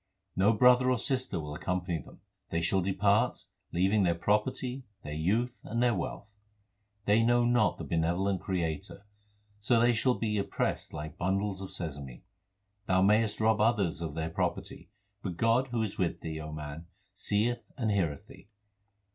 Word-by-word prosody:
No 100 +4 +4
brother 125 +3 +5
or 130 - +3
sister 130 - -1
will 75 -1 -5
accompany 90 +1 -2
them. - - -16 0.3
They 85 0 -1
shall 95 +3 +2
depart, 100 +3 +1 0.3
leaving 95 +4 +2
their 85 -3 +2
property, 125 +8 0 0.2
their 75 - -6
youth, 110 +11 0
and 115 - -3
their 120 -1 +4
wealth. 95 +1 -4 0.8
They 105 +2 +4
know 120 +1 +3
not 120 -2 +3
the - - -6
benevolent 85 +3 0
Creator, 90 +1 -3 0.5
so 115 +3 +3
they 120 +1 +4
shall 125 +3 +2
be 105 -2 0
pressed - - -2
like 75 0 -7
bundles 95 +1 -1
of 95 - -6
sesame. 70 -4 -6 0.6
Thou 95 0 +3
mayest 105 +2 +3
rob 110 -1 +3
others 105 -7 +2
of 80 -3 -4
their 80 0 -3
property; - - -3 0.3
But 90 -5 -5
God 115 +5 +3
who 120 -3 -1
is 105 -2 -5
with 90 -3 -1
thee, 80 -1 -5
O 75 0 -7
man, 75 +2 -7 0.3
seeth 110 +3 -1
and 115 -5 0
heareth 85 -8 -1
thee. - - -15
100 Hz, 165 wpm, -30 LUFS, 85-115 Hz, 0.8 s, brother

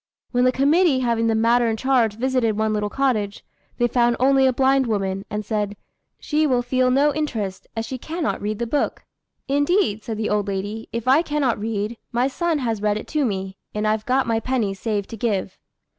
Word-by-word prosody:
When 245 0 +2
the 255 - +5
committee 285 +2 +3
having 230 -2 +1
the 225 - +2
matter 235 +2 +3
in 225 -1 0
charge 240 -4 +2
visited 245 -3 0
one 220 0 +1
little 210 -1 -1
cottage, 215 -6 -1 0.3
they 240 - +3
found 240 0 +2
only 270 +1 +4
a - - +4
blind 265 +1 +2
woman, 195 -2 -1
and 210 0 -4
said, 205 -1 -2 0.4
"She 305 0 +1
will 250 -3 +1
feel 255 +1 +1
no 280 +3 +3
interest, 225 -11 -3
as 225 - -1
she 255 +3 -6
cannot 320 +4 -3
read 210 +1 -2
the 235 - -2
book." 280 +5 -1 0.4
"Indeed," 285 - +1
said 225 -2 -4
the 215 0 -1
old 210 -1 0
lady, 205 +3 -4
"if 235 +1 -4
I 270 +5 +6
cannot 295 -8 0
read, 215 +1 -3
my 245 +2 +1
son 330 +4 -1
has 230 -6 -2
read 210 0 +1
it - - -7
to 305 -1 0
me, 195 -4 -3 0.2
and 210 0 0
I've 215 0 0
got 260 +1 +2
my 225 -2 +1
penny 230 -5 -1
saved 205 0 -2
to 225 - -6
give." 200 -4 -2
235 Hz, 205 wpm, -22 LUFS, 210-265 Hz, 0.4 s, I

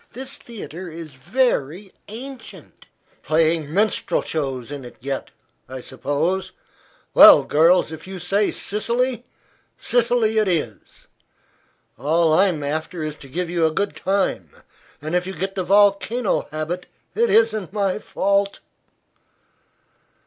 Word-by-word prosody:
This 260 +1 -7
theatre 185 -6 -9
is 160 -2 -9
very 180 - -1 0.2
ancient." 245 +2 -11 0.3
"Playing 160 -1 +1
minstrel 210 +5 +1
shows 135 -5 -3
in 140 -2 -6
it 120 - -11
yet, 135 +1 -4 0.4
I 130 0 -7
suppose. 145 +9 -2 0.6
Well, - - +9
girls, 165 +2 +3
if 160 +2 -9
you 190 0 -7
say 195 +4 +1
Sicily, 235 +3 -1 0.5
Sicily 235 -2 +1
it 215 - +1
is. 150 - -3 0.9
All 160 +4 +2
I'm 175 -3 +2
after 155 +3 -3
is 155 -1 -4
to 140 - -12
give 175 +6 -3
you 170 -1 +1
a - - -1
good 195 +6 -2
time, 190 - -1 0.5
and 155 +2 -4
if 180 0 0
you 190 - -5
get 190 +4 -3
the 190 - -2
volcano 205 +4 +2
habit 155 +4 -4 0.3
it 465 +1 +2
isn't 220 -5 +2
my 200 -1 -1
fault." 200 -1 0
180 Hz, 125 wpm, -22 LUFS, 155-205 Hz, 0.9 s, Well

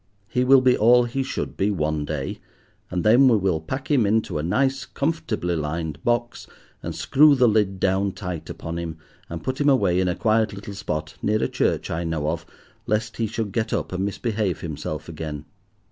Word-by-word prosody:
He 125 +3 0
will 130 +1 +6
be 130 -1 +4
all 120 +3 +5
he 120 +3 -2
should 135 - -4
be 100 +2 +1
one 75 -5 -1
day, 75 -3 -4 0.5
and 90 -1 -2
then 120 +5 +6
we 120 -4 +5
will 95 -5 0
pack 135 - -5
him 135 -5 +4
into 110 -6 0
a - - -1
nice, 135 - +1
comfortably 120 - -2
lined 80 0 -3
box, 120 0 -1 0.3
and - - -5
screw 150 +1 +5
the 125 -2 +4
lid 105 -3 +1
down 95 +1 +1
tight 90 -5 -6
upon 85 +1 -5
him, 80 -2 -5 0.3
and 85 -1 -6
put 130 +2 -2
him 145 - +4
away 100 -9 +3
in 95 - +1
a 90 - 0
quiet 110 -1 +1
little 100 +1 -8
spot 80 -5 -4
near 110 +1 +1
a - - +2
church - - -1
I 85 +1 -2
know 80 -2 -1
of, 85 - -5 0.4
lest 110 +1 -1
he 115 - 0
should 110 -1 -3
get 110 +3 -1
up - - -2
and 95 +1 -1
misbehave 100 -1 -2
himself 75 -1 -5
again. 75 -2 -6
100 Hz, 200 wpm, -23 LUFS, 85-120 Hz, 0.5 s, will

